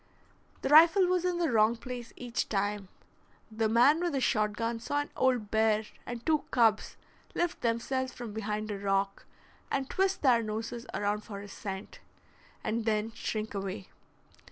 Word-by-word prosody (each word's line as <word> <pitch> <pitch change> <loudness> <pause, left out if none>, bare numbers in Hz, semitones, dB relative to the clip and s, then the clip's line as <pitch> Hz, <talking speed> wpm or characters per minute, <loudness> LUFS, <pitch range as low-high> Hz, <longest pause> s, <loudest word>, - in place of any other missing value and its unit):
The - - 0
rifle 330 +6 +7
was 360 0 +1
in 360 -1 0
the 335 -5 +1
wrong 220 0 +4
place 245 0 -7
each 240 -2 -3
time. 205 -1 -1 0.6
The 220 0 0
man 245 +8 +5
with 350 -2 -1
the 275 - +1
shot 215 -4 +1
gun 230 +1 -2
saw 290 +5 -1
an 290 - -8
old 250 -5 +1
bear 220 -1 +3 0.2
and 240 -1 -6
two 315 -2 +3
cubs 225 -4 +2 0.4
lift 345 0 -1
themselves 255 +3 -1
from 240 -3 -8
behind 215 0 -3
a 200 - -4
rock 195 0 -1 0.4
and 270 -1 -1
twist 385 +1 0
their 245 -4 +5
noses 225 +2 -5
around 205 +1 -1
for 200 -2 -7
his 200 0 -9
scent, 195 -1 -7 0.6
and 225 0 -1
then 215 0 0
shrink 220 -1 -4
away. 195 - -5
230 Hz, 165 wpm, -30 LUFS, 210-260 Hz, 0.6 s, rifle